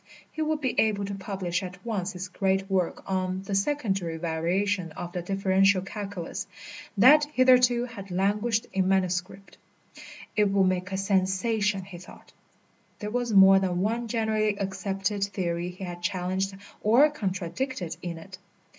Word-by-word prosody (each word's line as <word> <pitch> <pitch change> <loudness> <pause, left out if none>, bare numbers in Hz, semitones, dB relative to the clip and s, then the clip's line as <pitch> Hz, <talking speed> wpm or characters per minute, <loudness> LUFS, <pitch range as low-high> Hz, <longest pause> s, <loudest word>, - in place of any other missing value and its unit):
He 315 - -5
would 310 -1 0
be 260 -3 0
able 205 -2 +2
to 200 - -5
publish 190 -3 -3
at 185 +1 -9
once 200 -4 -2
his 185 +1 -5
great 195 0 0
work 185 -3 0
on 185 0 -2
"The 195 - -5
Secondary 195 - 0
Variation 170 +3 -1
of 175 +2 -6
the 180 -1 -3
Differential 195 +1 +2
Calculus," 200 -3 -6 0.5
that 290 +8 +7
hitherto 250 -3 +4
had 205 -5 -9
languished 210 +5 0
in 190 -1 +1
manuscript. 190 0 -1 0.8
It 210 0 +4
would 195 -1 +3
make 185 0 -1
a 190 - -1
sensation, 195 +1 +1
he 180 -2 -10
thought; 180 - -15 0.6
there 210 0 -5
was 245 0 -1
more 195 -1 +8
than 180 -2 -1
one 230 +4 -1
generally 215 -2 0
accepted 195 0 -2
theory 175 -3 -3
he 180 +2 -9
had 175 -1 -6
challenged 185 +2 -2 0.2
or 240 +8 +6
contradicted 195 - -3
in 170 -2 -5
it. 185 +3 -11
195 Hz, 150 wpm, -27 LUFS, 185-210 Hz, 0.8 s, more